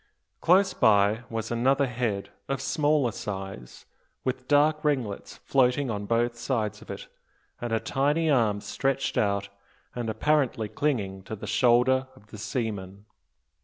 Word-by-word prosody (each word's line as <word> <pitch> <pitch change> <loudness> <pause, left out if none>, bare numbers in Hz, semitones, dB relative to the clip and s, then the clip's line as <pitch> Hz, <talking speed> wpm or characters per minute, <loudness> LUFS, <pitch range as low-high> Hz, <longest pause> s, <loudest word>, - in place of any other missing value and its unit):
Close 190 +3 +4
by 105 -1 +4
was 115 0 -4
another 135 +4 +2
head, 115 -5 -2 0.2
of 135 -1 -1
smaller 145 -3 +1
size, 95 - -7 0.4
with 130 0 -3
dark 150 +1 +3
ringlets 130 -9 -2
floating 130 0 +2
on 100 -1 -4
both 120 +1 +1
sides 115 -3 -2
of - - -15
it, - - -7 0.5
and 120 -1 -3
a 115 - +2
tiny 145 +6 +1
arm 115 -8 +2
stretched 135 +6 -1
out 100 -1 0 0.4
and 120 -2 -3
apparently 120 -1 +1
clinging 105 -5 -1
to 105 +3 -7
the 105 - -8
shoulder 130 +2 +3
of 105 -4 -21
the 105 - -9
seaman. 100 -4 -4
120 Hz, 140 wpm, -27 LUFS, 105-135 Hz, 0.5 s, Close